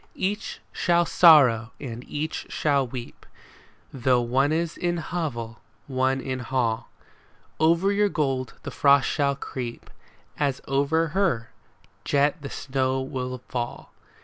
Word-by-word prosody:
Each 205 Hz, +2 st, -3 dB
shall 175 Hz, -1 st, +2 dB
sorrow 130 Hz, -11 st, +6 dB
and 120 Hz, -3 st, -6 dB
each 150 Hz, +2 st, -4 dB
shall 140 Hz, -3 st, +1 dB
weep. 120 Hz, 0 st, -8 dB, 0.7 s
Though 125 Hz, -1 st, +2 dB
one 135 Hz, +5 st, +2 dB
is 165 Hz, +1 st, -1 dB
in 175 Hz, 0 st, -1 dB
hovel, 145 Hz, -10 st, -4 dB, 0.2 s
one 130 Hz, 0 st, 0 dB
in 130 Hz, 0 st, -4 dB
hall; 120 Hz, -2 st, -1 dB, 0.7 s
Over 170 Hz, +5 st, +3 dB
your 205 Hz, 0 st, +2 dB
gold 135 Hz, -7 st, -1 dB
the -, -, -5 dB
frost 140 Hz, -2 st, +4 dB
shall 140 Hz, -1 st, +1 dB
creep, 125 Hz, -3 st, -7 dB, 0.5 s
As 140 Hz, -3 st, 0 dB
over 145 Hz, +4 st, +1 dB
her 150 Hz, -, 0 dB, 0.5 s
jet 145 Hz, +3 st, +1 dB
the 140 Hz, -, -6 dB
snows 130 Hz, 0 st, -2 dB
will 125 Hz, -1 st, -4 dB
fall. 120 Hz, -1 st, -5 dB
135 Hz, 125 wpm, -25 LUFS, 125-160 Hz, 0.7 s, sorrow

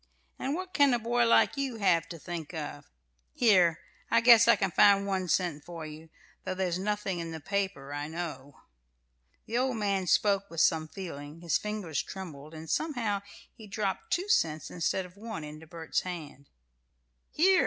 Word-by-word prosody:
"And 275 Hz, +3 st, -1 dB
what 370 Hz, +1 st, -6 dB
can 285 Hz, -4 st, +5 dB
a -, -, +2 dB
boy 235 Hz, +1 st, +1 dB
like 230 Hz, -, +4 dB
you 270 Hz, -3 st, -2 dB
have 185 Hz, -6 st, +2 dB
to 170 Hz, -, -7 dB
think 165 Hz, 0 st, -6 dB
of? 145 Hz, -2 st, -6 dB, 0.5 s
Here, 185 Hz, -8 st, +4 dB, 0.3 s
I 230 Hz, -, +5 dB
guess 230 Hz, -1 st, +7 dB
I -, -, +7 dB
can 195 Hz, -2 st, -1 dB
find 200 Hz, +3 st, +5 dB
one 190 Hz, -2 st, -1 dB
cent 170 Hz, -4 st, 0 dB
for 170 Hz, -2 st, -7 dB
you, 155 Hz, +1 st, -10 dB, 0.3 s
though 185 Hz, -, -3 dB
there's 185 Hz, -2 st, -1 dB
nothing 200 Hz, -2 st, -2 dB
in 165 Hz, 0 st, -4 dB
the 160 Hz, -1 st, -6 dB
paper, 185 Hz, -6 st, -3 dB
I 145 Hz, +1 st, -3 dB
know." 155 Hz, -4 st, -6 dB, 0.8 s
The 235 Hz, +2 st, -1 dB
old 255 Hz, -2 st, 0 dB
man 200 Hz, -3 st, 0 dB
spoke 200 Hz, +3 st, +2 dB
with 165 Hz, -, -5 dB
some 160 Hz, 0 st, +3 dB
feeling, 155 Hz, -4 st, -8 dB
his 170 Hz, -2 st, +1 dB
fingers 210 Hz, -9 st, -3 dB
trembled, 160 Hz, -5 st, -9 dB
and 160 Hz, +1 st, -8 dB
somehow 225 Hz, -, -1 dB, 0.3 s
he 220 Hz, -3 st, -13 dB
dropped 195 Hz, -2 st, -3 dB
two 365 Hz, +3 st, 0 dB
cents 160 Hz, -, +1 dB
instead 180 Hz, +2 st, -1 dB
of 180 Hz, +2 st, -15 dB
one 220 Hz, -6 st, -6 dB
into 155 Hz, +2 st, -9 dB
Bert's 165 Hz, 0 st, -2 dB
hand. 150 Hz, -6 st, -8 dB, 0.8 s
"Here! 375 Hz, +4 st, +4 dB
185 Hz, 175 wpm, -29 LUFS, 160-215 Hz, 0.8 s, guess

